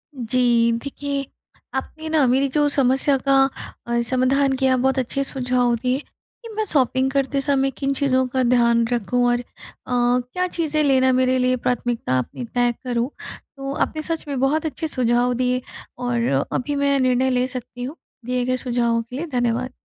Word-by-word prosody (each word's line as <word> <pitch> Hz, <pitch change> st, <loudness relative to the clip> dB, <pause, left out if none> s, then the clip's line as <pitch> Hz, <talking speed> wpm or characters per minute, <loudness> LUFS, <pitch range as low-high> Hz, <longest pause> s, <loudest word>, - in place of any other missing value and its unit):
जी, 240 Hz, -1 st, +2 dB
देखिए 280 Hz, 0 st, -3 dB, 0.5 s
आपने 310 Hz, +4 st, -5 dB
ना 310 Hz, -3 st, +3 dB
मेरी 265 Hz, +3 st, +3 dB
जो 295 Hz, +2 st, +2 dB
समस्या 270 Hz, 0 st, +3 dB
का 275 Hz, -, +5 dB, 0.5 s
अ, 235 Hz, 0 st, +1 dB
समाधान 265 Hz, +3 st, +2 dB
किया 265 Hz, -1 st, +3 dB
बहुत 265 Hz, +1 st, +1 dB
अच्छे 275 Hz, +2 st, -1 dB
सुझाव 250 Hz, -3 st, +1 dB
दिए, 250 Hz, +3 st, -1 dB
कि 460 Hz, +9 st, -16 dB
मैं 435 Hz, -, -1 dB
शॉपिंग 265 Hz, -, +2 dB
करते 275 Hz, 0 st, 0 dB
समय 275 Hz, -1 st, +1 dB
किन 275 Hz, 0 st, -2 dB
चीज़ों 260 Hz, -2 st, +1 dB
का 255 Hz, 0 st, 0 dB
ध्यान 235 Hz, -1 st, +3 dB
रखूँ 245 Hz, +1 st, 0 dB
और 240 Hz, -, +1 dB
अ, 245 Hz, -, -7 dB, 0.5 s
क्या 250 Hz, +8 st, +1 dB
चीज़ें 315 Hz, -3 st, 0 dB
लेना 260 Hz, -2 st, +4 dB
मेरे 255 Hz, 0 st, +2 dB
लिए 255 Hz, 0 st, +2 dB
प्राथमिकता 240 Hz, -, -1 dB
अपनी 240 Hz, -, -5 dB
तय 245 Hz, 0 st, +3 dB
करूँ। 245 Hz, 0 st, -1 dB, 0.5 s
तो 275 Hz, 0 st, -4 dB
आपने 310 Hz, -, -1 dB
सच 325 Hz, 0 st, -3 dB
में 280 Hz, -3 st, -3 dB
बहुत 295 Hz, +5 st, +1 dB
अच्छे 315 Hz, +1 st, -3 dB
सुझाव 245 Hz, -2 st, +1 dB
दिए 250 Hz, +1 st, 0 dB, 0.4 s
और 235 Hz, -, 0 dB
अभी 285 Hz, +3 st, -2 dB
मैं 280 Hz, -1 st, +2 dB
निर्णय 255 Hz, 0 st, +2 dB
ले 250 Hz, 0 st, +1 dB
सकती 250 Hz, -1 st, -7 dB
हूँ, 280 Hz, +6 st, -5 dB, 0.3 s
दिए 250 Hz, 0 st, -1 dB
गए 255 Hz, 0 st, 0 dB
सुझावों 235 Hz, -2 st, 0 dB
के 235 Hz, +2 st, -10 dB
लिए 305 Hz, +6 st, -3 dB
धन्यवाद। 245 Hz, +1 st, -1 dB
255 Hz, 170 wpm, -22 LUFS, 245-275 Hz, 0.5 s, का